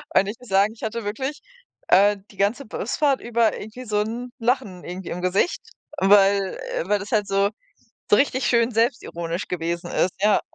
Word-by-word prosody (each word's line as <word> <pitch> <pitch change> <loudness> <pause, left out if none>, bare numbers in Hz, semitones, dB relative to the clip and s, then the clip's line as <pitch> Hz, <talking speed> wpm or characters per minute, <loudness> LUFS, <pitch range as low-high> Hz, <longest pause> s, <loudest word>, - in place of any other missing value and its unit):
Und 195 +1 +5
ich 210 - -5
muss 250 - -15
sagen, 200 +3 +3
ich 230 - -15
hatte 220 0 -3
wirklich, 265 +8 -3 0.5
äh, 200 +2 +5
die 200 - -19
ganze 215 +8 0
Busfahrt 265 +6 0
über 235 -1 +1
irgendwie 235 +4 -9
so 210 -1 0
'n 235 +3 -4
Lachen 230 -7 -1
irgendwie 180 +1 -6
im 180 - -4
Gesicht, 185 - +1 0.4
weil, 195 0 +4 0.2
äh, 170 - -2
weil 205 -1 +3
das 200 - -8
halt 210 -3 +1
so, 195 +1 +2 0.6
so 205 - +6
richtig 270 -2 +1
schön 235 0 +3
selbstironisch 210 -7 -1
gewesen 170 0 -3
ist, 180 - +1
ja. 210 0 +4
210 Hz, 180 wpm, -23 LUFS, 195-235 Hz, 0.6 s, so